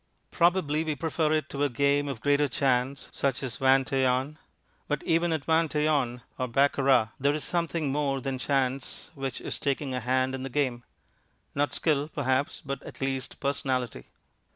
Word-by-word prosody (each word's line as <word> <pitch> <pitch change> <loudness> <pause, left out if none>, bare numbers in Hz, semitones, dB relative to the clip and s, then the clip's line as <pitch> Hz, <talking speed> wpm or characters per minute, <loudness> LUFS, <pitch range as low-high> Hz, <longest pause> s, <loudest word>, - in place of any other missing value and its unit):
Probably 170 -3 +2
we 155 -2 -2
prefer 155 +1 0
it 155 -1 +1
to 140 0 -2
a 145 - +2
game 140 +3 +2
of 135 -6 -5
greater 145 0 +3
chance, 135 0 0
such 135 -1 -1
as 130 - -4
vingt 135 +1 +3
et 135 -1 +3
un. 130 +4 0 0.5
But 150 -2 -1
even 165 +1 +2
at 160 -3 -1
vingt 160 -1 +2
et 150 0 +2
un 125 -6 0 0.2
or 130 - 0
baccarat 135 -2 +3
there 140 +2 +2
is 150 - -3
something 165 -4 -1
more 140 -1 0
than 130 0 -3
chance 135 +3 -1
which 135 -4 -4
is - - -5
taking 140 -1 -1
a 125 - -1
hand 130 +2 +1
in 135 - -4
the 135 - -4
game; 125 -3 -1 0.7
not 145 -1 0
skill, 150 -3 +1
perhaps, 135 -1 -1
but 140 -1 -4
at - - -10
least 135 -1 -3
personality. 130 - -2
140 Hz, 180 wpm, -28 LUFS, 130-150 Hz, 0.7 s, greater